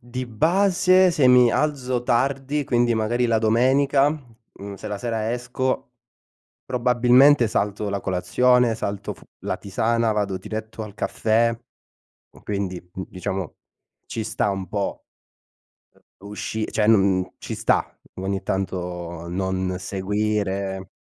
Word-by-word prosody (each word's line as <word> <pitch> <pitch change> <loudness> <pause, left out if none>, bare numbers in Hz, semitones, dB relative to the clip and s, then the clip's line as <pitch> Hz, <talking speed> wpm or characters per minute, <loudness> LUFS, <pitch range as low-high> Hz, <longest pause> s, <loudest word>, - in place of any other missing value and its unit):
di 125 +1 -6
base 185 - +3
se 150 -6 +3
mi 125 -1 +6
alzo 130 -4 0
tardi, 135 +4 0
quindi 120 -2 +2
magari 120 +3 +1
la 115 -1 +2
domenica, 135 +5 +3
mhmm, 115 -8 -10
se 100 +3 -8
la 105 -1 -4
sera 115 0 -2
esco, 125 +2 -2 0.7
probabilmente 125 +1 +4
salto 105 0 -1
la 100 0 -2
colazione, 115 +7 +2
salto 100 -1 -4
f 80 - -21 0.2
la - - -3
tisana, 115 +3 0
vado 100 -3 -1
diretto 110 +3 -6
al 105 -2 -9
caffè, 115 +2 +1 0.9
quindi 100 -3 -3 0.2
n 95 - -5
diciamo, 95 -1 -4 0.5
ci 110 - -4
sta 105 - 0
un 95 -1 -4
po', 100 -2 -3 1.2
uhm, 100 +1 -11
usci 110 +1 -3
cioè 105 -1 +1
n 95 -4 +4
ci - - -6
sta - - +1 0.2
ogni 95 +1 -3
tanto 90 -3 -4
non 95 0 -2
seguire 100 0 -2
110 Hz, 125 wpm, -23 LUFS, 100-125 Hz, 1.2 s, mi